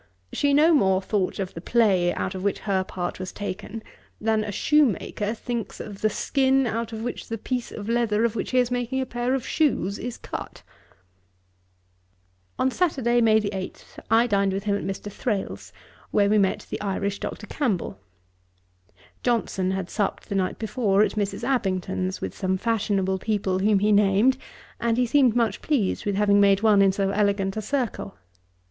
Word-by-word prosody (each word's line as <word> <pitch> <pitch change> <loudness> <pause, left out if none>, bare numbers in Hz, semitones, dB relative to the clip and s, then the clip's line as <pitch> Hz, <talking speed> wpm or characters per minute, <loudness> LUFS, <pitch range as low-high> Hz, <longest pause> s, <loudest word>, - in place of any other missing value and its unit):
She 285 - +2
no 305 +4 +5
more 190 -10 +4
thought 190 -1 -1
of 190 -2 -4
the 165 - -7
play 190 -5 +3
out 185 - -3
of 185 -1 -6
which 200 - 0
her 195 -3 0
part 180 -1 -5
was 185 0 -5
taken, 210 +2 -6 0.4
than 220 0 +1
a 210 - -4
shoemaker 230 -5 +1
thinks 235 -1 -5
of 205 -2 -8
the 215 - +3
skin, 265 +4 +2
out 230 0 -2
of 220 0 -5
which 245 - -5
the 225 - -3
piece 245 +2 -3
of 205 -1 -7
leather, 230 -2 +1
of 230 -1 -1
which 210 - -3
he 255 - 0
is 250 -1 +3
making 245 +1 -1
a 260 - 0
pair 245 +1 -1
of 265 -1 -3
shoes, 205 - 0
is 245 0 -5
cut.' - - -7 1.9
On 260 - +1
Saturday, 255 -8 +1
May 220 -1 +5
8, 200 -3 -5
I 225 +2 +5
dined 200 -4 +1
with 195 +1 -3
him 205 -1 +1
at - - -3
Mr. 195 +1 -5
Thrale's, 205 -2 -3 0.4
where 200 0 +2
we 215 - +4
met 195 -1 0
the - - -4
Irish 200 0 -2
Dr. 210 - -5
Campbell. 210 - -2 1.2
Johnson 225 -6 0
had 190 -1 -2
supped 205 0 -2
the - - -2
night 190 -2 0
before 215 -3 +2
at - - +1
Mrs. 205 -2 -3
Abington's, 190 -6 -1
with - - -4
some 190 0 -1
fashionable 195 -3 0
people 195 -3 -1
whom 205 +1 +3
he 210 +2 +2
named; 210 +6 +4 0.4
and 235 -1 +1
he 250 - +3
seemed 250 -2 +3
much 230 -4 +1
pleased 240 -10 0
with 200 - 0
having 205 0 +4
made 200 +1 +4
one 210 -3 +5
in 195 -1 +5
so 195 0 0
elegant 200 -1 +1
a 215 - -2
circle. 235 -4 -3
210 Hz, 180 wpm, -25 LUFS, 195-240 Hz, 1.9 s, no